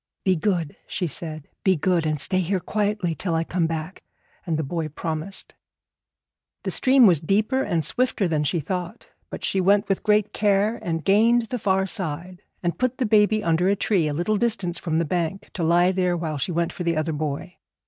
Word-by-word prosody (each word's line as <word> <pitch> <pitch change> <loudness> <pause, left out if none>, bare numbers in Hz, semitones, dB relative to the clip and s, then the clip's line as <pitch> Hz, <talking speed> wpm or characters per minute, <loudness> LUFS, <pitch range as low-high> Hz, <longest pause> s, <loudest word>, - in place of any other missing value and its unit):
'Be 185 -1 +4
good,' 170 -4 -1
she 180 - -2
said; 155 -1 -3 0.2
'be 190 -1 +4
good, 170 0 +1
and 155 -1 -1
stay 185 +6 +1
here 185 +1 0
quietly 205 -3 -1
till 170 +1 -2
I 165 - +1
come 170 0 0
back;' 160 +3 -5 0.5
and 160 -2 0
the 160 - -1
boy 160 +2 -3
promised. 160 +4 -4 1.1
The - - -1
stream 260 -1 +5
was 175 -7 +5
deeper 210 - +1
and 165 -9 -1
swifter 245 -6 +1
than 155 -3 0
she 165 +4 0
thought; 180 - -5 0.2
but - - -8
she 190 - +1
went 200 +2 +3
with 195 - 0
great 210 -1 +2
care 210 +2 +2
and 165 -2 -3
gained 225 +4 +4
the 250 - -3
far 190 -2 +1
side, 180 -2 -3 0.2
and 175 -1 -2
put 255 0 0
the 255 - 0
baby 215 0 +3
under 170 +3 +2
a 200 - +3
tree 190 -5 +1
a 150 - -1
little 190 +7 0
distance 205 -6 -1
from 160 -2 -1
the 165 - +1
bank, 175 +4 -3
to 185 - -4
lie 175 +2 +4
there 180 -2 0
while 155 -3 -3
she 155 - -2
went 170 0 -1
for 180 - -5
the 170 -2 0
other 155 +1 -1
boy. 150 +3 -4
180 Hz, 205 wpm, -24 LUFS, 165-205 Hz, 1.1 s, stream